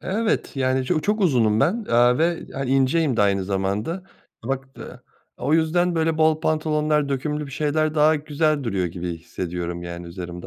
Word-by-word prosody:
Evet, 215 -3 -1
yani 130 0 +1
ço 155 - 0
çok 210 +5 0
uzunum 120 - +3
ben, 205 +11 +1
eee, 120 +1 +4
ve 165 +1 0
hani 135 -1 -3
inceyim 135 +1 +2
de 105 - +3
aynı 100 -1 +1
zamanda. 100 - -2 0.4
Bak, 135 +2 -3
eee, - - -10 0.4
o 140 +5 0
yüzden 170 +2 +2
böyle 160 -1 0
bol 155 0 +3
pantolonlar, 155 -2 +1
dökümlü 150 +2 -2
bir - - -10
şeyler, 155 +2 0
daha 155 +1 +4
güzel 150 0 0
duruyor 95 -6 -1
gibi 85 0 -5
hissediyorum 85 +1 -5
yani 85 0 -7
üzerimde. 90 0 -7
140 Hz, 170 wpm, -23 LUFS, 100-155 Hz, 0.4 s, eee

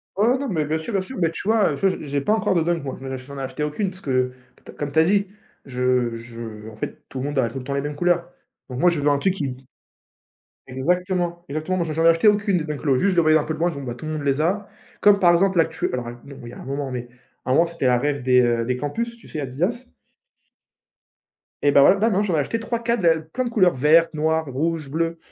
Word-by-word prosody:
Oh 235 +6 +3
non, 280 - -3
mais 160 - -1
bien 155 +2 -1
sûr, 160 +8 -6
bien 195 - +1
sûr, 260 +7 -8
mais 165 -2 +2
tu 180 - -7
vois? 215 -8 +3
Tu 195 +8 +1
vois, - - +4
j'ai 150 - -9
j'ai 140 0 -1
pas 210 - +1
encore 215 -3 +1
de 170 - +2
Dunk, 170 -1 0
moi, 135 - -5
j 135 0 -5
j'en 140 0 -9
ai - - -4
acheté 135 +3 -4
aucune, 165 +7 -1
parce 185 +1 -11
que 130 -2 0 0.3
t - - -11
comme 145 -1 -4
tu 160 - +2
as 160 - +7
dit, 200 +3 +2 0.4
je 125 -2 0
je 115 -2 -8
en 110 - -12
fait 110 - -6
tout 135 - -8
le 130 - -3
monde 145 -1 -1
a 120 - +2
tout 115 - -8
le 130 - -5
temps 140 +2 -4
les 140 - 0
mêmes 145 0 -4
couleurs. 175 +1 +1 0.4
Donc 125 0 -5
moi 175 +4 +5
je 170 - -2
veux 145 +1 +2
un 145 - +3
truc 190 +5 +1
qui 140 -8 -4 1.1
exactement! 175 +5 -1
Exactement, 155 +6 -2
moi 170 - 0
j'en 165 +2 0
acheté 165 +5 +5
aucune 205 -2 +3
de - - -3
Dunk 150 -2 -5
Low, 135 -4 +2
juste 200 - +2
je 185 - -1
les 170 - +5
voyais 155 0 +5
un 150 - -1
peu 155 +1 -3
de - - -11
loin, 175 +1 +2
je 140 - -7
me 140 - -7
dis: 120 - -5
«Tout 155 - -9
le 155 - -3
monde 155 - -3
les 140 0 +1
a». 195 +6 0 0.3
Comme 205 -1 +6
par 175 -2 +5
exemple, 190 +1 +2
là 165 - +6
actu 160 0 -3
alors 120 -2 -4
non, 140 -1 -11
il 120 - -8
y - - -11
a - - -11
un - - -10
moment 140 0 -3
mais 125 -1 -5 0.4
à - - -5
un - - +4
moment 165 +5 +5
c'était 165 -6 -2
un 125 - +4
rêve 140 +2 -1
des, 125 0 +4
heu, 120 -1 +1
des 125 +1 -1
campus, 235 - -3
tu 230 - -17
sais 155 - -5
Adidas? 175 - -2 1.8
Eh 145 - +5
ben 140 - +6
ouais, 185 - +7
ben 220 +4 +2
non 200 0 +1
j'en 190 -5 -1
acheté 155 +10 -1
3-4 235 0 -1
de 175 - +3
la 160 -1 +4
plein 240 +12 -4
de 240 - -2
couleurs 185 -6 +3
vertes, 160 +5 +4
noires, 160 +1 +1
rouges, 155 +2 -2
bleues, 165 +3 -1
155 Hz, 285 wpm, -22 LUFS, 135-185 Hz, 1.8 s, as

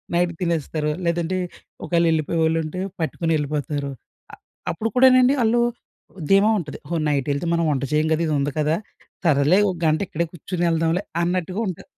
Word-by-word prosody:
Night 175 0 +2
తినేస్తారు. 160 -3 -1
లేదంటే 170 +1 0 0.5
ఒకవేళ 170 -1 +2
ఎళ్ళిపోయేవాళ్ళుంటే 160 +1 0 0.2
పట్టుకుని 165 0 -1
ఎళ్ళిపోతారు. 145 -1 -3 0.4
అ - - -7 0.4
అప్పుడు 220 +7 -2
కూడా 260 +1 +7
నండి 255 +2 +5
వాళ్ళు 235 +1 +3 0.6
ఓ - - -10
ధీమా 195 +2 +5
ఉంటది. 150 -4 -6
హో! 170 - -1
నైట్ 140 -3 0
ఎళ్తే 140 +4 -3
మనం 170 -1 +1
వంట 140 -1 -1
చేయం 155 +1 +2
కదా! 160 - 0
ఇదుంది 145 -2 0
కదా! 150 +1 +2 0.5
సరేలే 150 +4 +4
ఒక 185 - -3
గంట 155 0 +3
ఇక్కడే 170 +2 -1
కుర్చొని 175 +1 -3
ఎళ్దాంలే 165 +3 +1 0.2
అన్నట్టుగా 180 +3 -1
ఉంటా 180 - -5
165 Hz, 160 wpm, -22 LUFS, 150-180 Hz, 0.6 s, కూడా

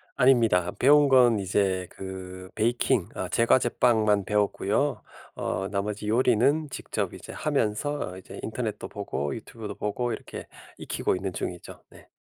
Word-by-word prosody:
아닙니다. 115 -9 +4
배운 145 +2 +6
건 125 -4 +5
이제 95 -1 0
그 95 -1 -8
베이킹 120 -2 +1
어 95 - -4
제과제빵만 115 -2 +3
배웠고요. 105 +5 0 0.3
어 95 +2 -2
나머지 105 +1 -3
요리는 125 +6 +3
직접 - - -4
이제 - - -10
하면서 125 +8 -1
어 90 - -9
이제 95 - -11
인터넷도 - - -4
보고 70 +2 -3
유튜브도 110 -1 -8
보고 120 +3 -2
이렇게 - - -7 0.3
익히고 - - -1
있는 95 0 -4
중이죠. 90 0 -6
네. - - -17
105 Hz, 315 characters per minute, -26 LUFS, 95-125 Hz, 0.3 s, 배운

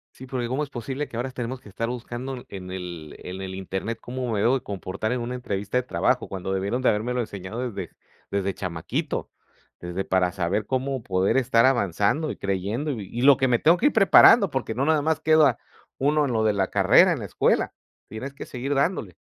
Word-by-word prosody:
Sí, 130 - -10
porque, 125 -2 -3
¿cómo 130 +5 -1
es 145 - -4
posible 135 +3 -4
que - - -9
ahora 125 +3 -2
tenemos 125 0 -5
que 105 - -13
estar 115 +4 -3
buscando 125 +1 -5
en 95 -2 -8
el 85 -5 -7
en 90 +1 -6
el 95 -1 -5
internet 95 +4 -4
cómo 125 0 -5
me 105 -3 0
debo 120 +5 +3
de - - -16
comportar 100 +2 -4
en 125 -1 -1
una 125 +2 -4
entrevista 105 -2 -2
de 125 - -1
trabajo, 125 -1 0
cuando 95 0 -4
debieron 100 +6 -1
de - - +4
habérmelo 120 +4 -1
enseñado 100 +1 -5
desde 95 -4 -7 0.4
desde 100 -1 -1
chamaquito. 85 -4 -3 0.5
Desde, 90 +2 -4
para 95 -1 +2
saber 95 +2 -1
cómo 130 0 -2
poder 95 +3 +1
estar 120 -2 +4
avanzando 120 - +1
y - - -5
creyendo, 100 +10 -2
y - - -2
vi 105 -5 -7
y 120 +1 -4
lo 140 -1 +7
que 130 -1 +1
me 120 -1 +3
tengo 165 +3 +5
que 290 - +2
ir 295 - +4
preparando 200 0 +7
porque 130 -5 -3
no 135 - +1
nada 155 -1 +2
más 160 +1 +1
queda 155 -5 +4 0.4
uno 150 +2 +2
en 130 - -1
lo 110 -1 +1
de 110 - +3
la 95 -2 0
carrera, - - +5
en - - -2
la - - -6
escuela. - - +1 0.4
Tienes 110 +6 -6
que 140 - -9
seguir 135 +3 -3
dándole. 135 - 0
120 Hz, 220 wpm, -25 LUFS, 95-130 Hz, 0.5 s, lo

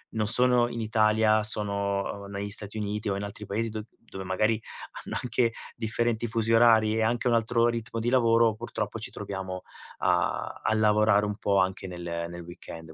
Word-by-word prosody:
non 110 -1 0
sono 125 0 +4
in 120 - -6
Italia, 110 -1 +3
sono 100 -1 -1
negli 100 +1 -5
Stati 105 +1 +1
Uniti 105 0 -3
o 95 - 0
in 100 - -4
altri 105 +1 -7
paesi 115 +3 -2
do 110 -1 -5 0.3
dove 95 -1 -6
magari 110 +4 +1 0.4
hanno - - -4
anche 115 -1 +1 0.2
differenti 120 0 -1
fusi 115 0 0
orari 110 -2 +5
e - - +1
anche 120 +2 0
un 120 - +3
altro 115 +1 +2
ritmo 115 0 -2
di 120 +2 0
lavoro, 115 -3 +4
purtroppo 115 +3 -5
ci - - -3
troviamo, 95 -2 -6 0.4
a - - 0
a 110 - +1
lavorare 105 -1 +3
un 105 -1 -3
po' 100 -1 +1
anche 95 0 0
nel 85 -1 -5
nel 85 0 -8
weekend. 80 -2 -10
110 Hz, 180 wpm, -27 LUFS, 100-115 Hz, 0.4 s, orari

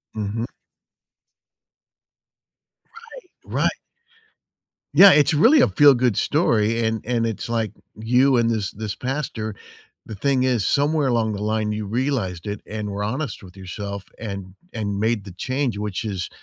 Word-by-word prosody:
Mhm. 110 +2 -3 3.0
Right. - - -2
Right. - - +4 1.2
Yeah, 200 -1 +9
it's 150 0 +4
really 240 - +6
a - - +5
feel-good 130 - +4
story, 115 -7 +1
and 110 -1 -1
and 115 -1 0
it's 115 0 -4
like 115 -2 -1 0.2
you 125 +4 +3
and 115 -1 +2
this 110 -4 -1
this 105 -1 -5
pastor, 125 -4 -4 0.5
the 110 - -8
thing 130 +4 +1
is 125 -6 +1
somewhere 145 0 +2
along 115 -3 +1
the 100 - -5
line 110 0 0
you 105 0 -3
realized 110 -6 -2
it 105 0 -4
and 105 -1 -5
were 100 +1 -4
honest 125 +3 -4
with 90 +1 -14
yourself 100 +1 -6
and 100 -4 -7 0.2
and 100 -3 -3
made 110 -1 0
the 95 - -9
change, 130 +3 -2
which 105 -1 -3
is 95 -5 -3
110 Hz, 145 wpm, -22 LUFS, 105-130 Hz, 3.0 s, Yeah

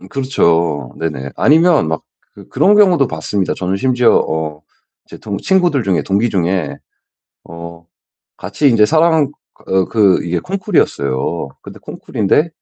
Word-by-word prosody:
음 95 - -14
그렇죠. 85 - 0
네네. 75 -5 -4
아니면 160 - +3
막 80 - -3 0.3
그 - - -14
그런 205 +2 +3
경우도 180 -9 +4
봤습니다. 90 +5 -3
저는 95 +1 -2
심지어 125 +1 +2
어 80 -1 -2 0.5
제 - - -11
동 100 -2 -5
친구들 175 -9 +1
중에 95 -3 0
동기 105 +4 0
중에 90 -2 -1 0.7
어 85 0 -11 0.5
같이 100 +11 -2
인제 105 -2 +4
사랑 160 -2 +2 0.4
어 95 -1 +2
그 100 -5 +2
이게 85 0 -1
콩쿠르였어요. 85 - -2
근데 - - -12
콩쿠르인데 130 - -1
100 Hz, 290 characters per minute, -16 LUFS, -, 0.7 s, 경우도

